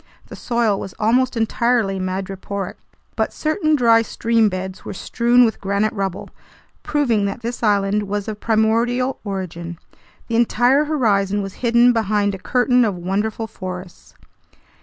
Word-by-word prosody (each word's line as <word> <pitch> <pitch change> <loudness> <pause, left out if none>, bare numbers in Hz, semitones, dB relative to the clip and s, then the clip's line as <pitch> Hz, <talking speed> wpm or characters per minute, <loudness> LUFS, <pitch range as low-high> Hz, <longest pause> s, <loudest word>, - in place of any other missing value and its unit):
The - - -8
soil 235 -4 0
was 190 - -7
almost 245 +3 +1
entirely 225 -3 +1
madreporic, 190 +1 -4 0.4
but - - 0
certain 310 0 0
dry 230 -4 +5
stream 225 0 +1
beds 185 0 -6
were - - -7
strewn 240 +4 +3
with 220 - -2
granite 200 +2 0
rubble, 195 -3 -4 0.5
proving 240 -9 +1
that 200 +4 -4
this 240 +1 -4
island 205 -1 +1
was 205 +1 -3
of 215 -1 -5
primordial 230 +4 +1
origin. 175 -4 -5 0.5
The 230 - 0
entire 245 +4 +3
horizon 205 -9 +1
was 195 -1 -6
hidden 240 0 +4
behind 210 -2 +1
a 195 - -6
curtain 250 +3 +2
of 210 -4 0
wonderful 205 +5 -2
forests. 185 -4 -9
220 Hz, 140 wpm, -20 LUFS, 195-240 Hz, 0.5 s, dry